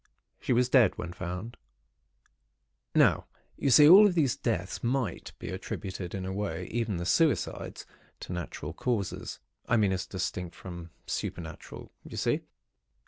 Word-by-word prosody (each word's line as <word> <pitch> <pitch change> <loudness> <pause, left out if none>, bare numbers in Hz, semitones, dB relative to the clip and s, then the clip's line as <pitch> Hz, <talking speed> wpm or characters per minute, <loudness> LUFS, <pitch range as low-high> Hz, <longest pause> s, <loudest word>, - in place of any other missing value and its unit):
She - - -3
was 125 0 +4
dead, 125 -6 +4
when 85 0 -5
found. 90 +7 -6 1.4
"Now, - - +4 0.3
you 140 - 0
see, 145 +4 +8
all 200 +6 +10
of 185 - -1
these 145 -7 +2
deaths - - -2
might 120 -5 -1
be - - -7
attributed 95 -1 -5
in 95 -1 -4
a 95 - -3
way—even 100 +2 -2
the 85 - -3
suicides—to 130 - -1
natural 85 -3 -5
causes, 105 0 -2 0.3
I 120 - +4
mean, 105 -3 +3
as 95 -1 -2
distinct 90 -2 -4
from 85 -2 -8 0.2
supernatural. 80 -2 -6
You - - -9
see? - - +1
95 Hz, 140 wpm, -29 LUFS, 90-125 Hz, 1.4 s, all